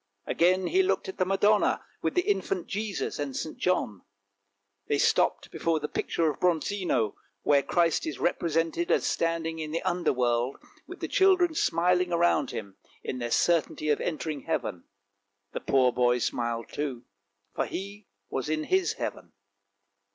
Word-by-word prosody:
Again 185 +2 +2
he 375 +2 +3
looked 380 - 0
at 190 - -8
the 185 - +3
Madonna, 205 +2 +3 0.2
with - - -1
the 360 - +3
infant 390 -2 -1
Jesus 205 -5 -3
and 140 -3 -3
St. 155 - -4
John. 110 - 0 0.9
They 145 - +1
stopped - - +2
before 165 -1 0
the 150 - -3
picture 165 +1 -1
of 150 - -2
Bronzino, 175 - +1 0.3
where 140 -1 +4
Christ 170 - +1
is 320 - -4
represented 165 0 0
as - - +2
standing 165 -1 -1
in 155 -1 -4
the 165 - -2
under 175 -1 +1
world, 125 0 0 0.3
with - - -10
the - - -2
children 370 -3 +4
smiling 180 - +2
around 170 -5 +2
Him, 100 -2 -7 0.3
in 125 - -4
their 120 -1 -3
certainty 155 +1 +1
of 150 - +2
entering 155 -3 -3
heaven. 90 -2 -2 0.7
The - - -4
poor 130 -2 +3
boy 125 0 +3
smiled 120 0 -2
too, 135 -5 -4 0.5
for - - -1
he 200 +2 -7 0.2
was 135 +3 -3
in 155 0 0
his 375 0 +1
heaven. - - -6
165 Hz, 160 wpm, -28 LUFS, 135-185 Hz, 0.9 s, where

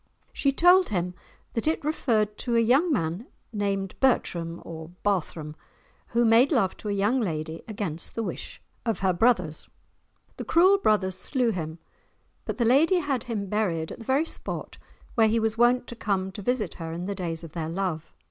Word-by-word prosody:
She 280 - +2
told 355 +6 +5
him 180 -3 -1 0.4
that 230 - -2
it 315 -2 0
referred 220 -9 +1
to 240 -2 0
a - - +5
young 265 +10 +3
man 175 - -1 0.3
named 195 -2 -1
Bertram 170 -10 +1
or 160 -1 -8
Barthrum, 160 -6 -1 0.5
who 235 0 +2
made 230 +6 +5
love 230 - +2
to 210 - -6
a - - 0
young 205 +6 +2
lady 160 -4 -3
against 195 -7 -5
the 230 - -1
wish - - -6 0.2
of 225 -4 -1
her 190 -1 +3
brothers. 180 -6 +1 0.7
The - - -4
cruel 375 +4 +5
brothers 190 - +1
slew 245 +3 +1
him, 160 -4 -4 0.7
but - - -4
the 235 - +1
lady 300 +10 +5
had 285 -7 -1
him 220 -5 -3
buried 185 -6 -1
at - - -8
the 230 - -10
very 275 +6 +2
spot - - -6 0.3
where 225 -2 +4
he 225 +1 +2
was 220 0 0
wont 240 +2 +3
to 240 - -8
come 190 -4 -1
to 205 - -8
visit 215 -3 -1
her 165 0 -4
in 170 +2 -4
the 200 - -2
days 170 -4 -4
of 165 - -9
their 160 -1 -4
love. 170 -3 -3
210 Hz, 185 wpm, -26 LUFS, 175-245 Hz, 0.7 s, told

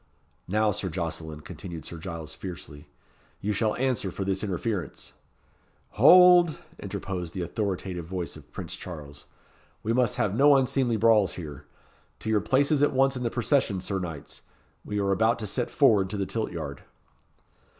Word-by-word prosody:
"Now, 105 +2 +2
Sir 95 -1 -3
Jocelyn," 80 -3 -5
continued 85 0 -8
Sir 85 - -8
Giles, 85 -3 -6
fiercely; 75 -5 -9 0.5
"you 105 +1 -1
shall 110 +1 0
answer 125 -6 -1
for 95 +2 -4
this 95 +1 -1
interference" 100 -1 -3 0.8
"Hold!" 175 +5 +7 0.2
interposed 90 -4 -5
the 90 - -2
authoritative 90 -2 -3
voice 90 -1 -4
of - - -15
Prince - - -6
Charles; 75 -5 -9 0.6
"we 115 - 0
must 125 -1 +2
have 100 - 0
no 140 +5 +6
unseemly 130 -3 +2
brawls 110 -3 +4
here. 75 -4 -8 0.5
To 110 - -2
your 105 -2 +3
places 140 +2 +2
at 145 - +3
once 135 +1 +3
in 125 - -4
the 120 - 0
procession, 120 -4 +1
Sir 95 +1 -3
Knights. 80 -6 -7 0.4
We 105 - -4
are 100 -1 +1
about 110 +4 +3
to 110 - -5
set 120 +4 -2
forward 105 -10 +4
to 105 - -3
the 100 - -1
tilt 110 +2 -3
yard." 75 -6 -6
100 Hz, 160 wpm, -27 LUFS, 85-120 Hz, 0.8 s, Hold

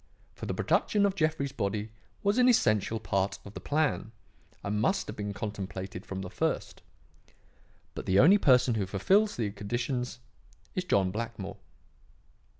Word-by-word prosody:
For - - -7
the - - -2
production 205 -1 +2
of 200 - +2
Jeffrey's 155 -6 0
body 105 -1 -2 0.3
was 205 +4 +2
an 250 0 +6
essential 110 - +2
part 95 -1 -1
of 100 - -10
the - - -6
plan 145 -7 0 0.5
and 105 +1 -1
must 195 - +1
have - - -7
been 105 -1 -4
contemplated 95 -2 -5
from 95 0 -4
the 90 - -6
first. - - -2 1.1
But - - -7
the 95 - +3
only 185 - +7
person 125 -6 +5
who 105 -4 -1
fulfills 195 - +2
the 110 -4 -1
conditions 120 +5 -3 0.6
is 185 - -2
John 95 - +2
Blackmore. 110 -2 -5
110 Hz, 150 wpm, -29 LUFS, 100-155 Hz, 1.1 s, only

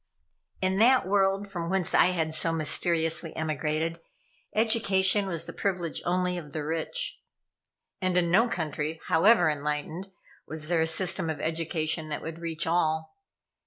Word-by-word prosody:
In 190 +1 +1
that 250 -1 +5
world, 195 0 +2
from 175 -4 -4
whence 190 -2 -1
I - - +6
had 160 -3 -1
so 165 +1 0
mysteriously 165 +1 +1
emigrated, 160 +1 -2 0.6
education 205 -3 +3
was 170 -3 -3
the 170 - -8
privilege 180 -4 -2
only 180 0 0
of 150 -4 -12
the 155 - -3
rich. 165 - -2 0.8
And 185 -1 +1
in 170 -1 +2
no 225 +7 +5
country, 160 -4 -3
however 180 +2 +5
enlightened, 150 +5 -3 0.4
was 155 0 -4
there 170 -2 +2
a 160 - +2
system 185 0 0
of 155 -3 -3
education 160 0 -2
that 150 - -4
would 160 0 -6
reach 165 -1 -2
all. 160 -1 0
170 Hz, 150 wpm, -27 LUFS, 160-190 Hz, 0.8 s, I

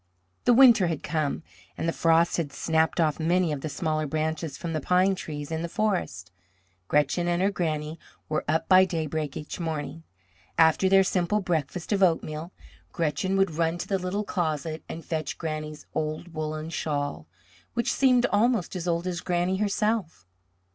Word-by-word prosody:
The 245 - +6
winter 240 -7 +7
had 165 -3 -3
come 155 -1 -1 0.3
and - - -2
the 165 - +1
frost 165 0 +3
had 160 -5 -2
snapped 160 +4 +1
off 155 -2 +2
many 170 +1 +2
of 145 -2 -3
the 155 - -4
smaller 155 0 -1
branches 155 0 -2
from 165 -1 -4
the 155 - -1
pine 185 +5 +3
trees 150 -5 -6
in 160 0 -2
the 170 - -3
forest. 175 - -2 0.6
Gretchen 150 - +1
and 175 0 +1
her 195 +2 +2
Granny 155 -3 -2 0.3
were 155 - -1
up 160 +2 0
by 185 0 +7
daybreak 155 -5 -2
each 150 - -7
morning. 160 -1 -4 0.6
After 160 +4 +4
their 195 0 +6
simple 190 +2 +1
breakfast 170 -2 -2
of 200 -2 +1
oatmeal, 165 -2 +1 0.4
Gretchen 180 +4 -1
would 195 -2 +3
run 165 +1 0
to 175 - -5
the 195 -1 0
little 185 +3 -2
closet 160 -5 -2
and 165 - -7
fetch 155 -2 -3
Granny's 155 -2 -5
old 155 +2 -3
woollen 155 0 -4
shawl, 145 - -3 0.5
which 235 - +1
seemed 250 -2 +4
almost 210 -3 +2
as 180 -1 -4
old 170 0 0
as 180 -2 -3
Granny 180 +1 0
herself. 205 - -1
165 Hz, 170 wpm, -26 LUFS, 155-185 Hz, 0.6 s, winter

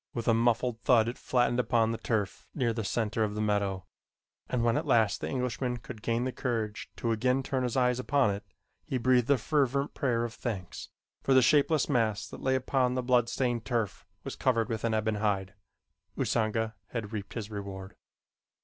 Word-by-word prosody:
With 115 -2 -3
a 115 - +5
muffled 120 0 +1
thud 115 -4 +4
it 120 - -4
flattened 120 -1 +1
upon 115 -2 +2
the 115 - -3
turf 105 -5 -2
near 120 -5 +1
the 110 -1 -3
center 110 +2 0
of 105 -1 -2
the - - -3
meadow, 100 -3 0 0.6
and 125 -2 0
when 115 -1 +3
at - - -1
last 110 -3 +3
the - - -3
Englishman 125 -1 -2
could 120 -1 -10
gain 115 +2 0
the 130 - -1
courage 115 -4 -3
to 115 - -1
again 125 +4 +1
turn 130 0 -1
his 125 0 -1
eyes 125 -1 +2
upon 135 -3 +2
it, 100 +2 -6 0.4
he 130 - -2
breathed 125 0 +3
a 140 - +5
fervent 140 +2 0
prayer 120 -5 0
of 120 -1 -4
thanks, 100 -9 -5 0.3
for 135 - +2
the 130 - +7
shapeless 150 +3 +3
mass 110 -6 +1
that - - -9
lay 130 0 +2
upon 130 -1 +1
the 130 - -1
blood 120 -2 +3
stained 120 -3 -1
turf 110 -2 -2 0.2
was - - -5
covered 115 -2 +1
with 110 -2 -3
an 115 -1 +1
ebon 110 0 0
hide. 100 -2 0 0.6
Usanga 110 -1 0
had 115 -3 -5
reaped 105 -2 -5
his 110 -2 -5
reward. 100 -2 -7
115 Hz, 195 wpm, -29 LUFS, 110-125 Hz, 0.6 s, the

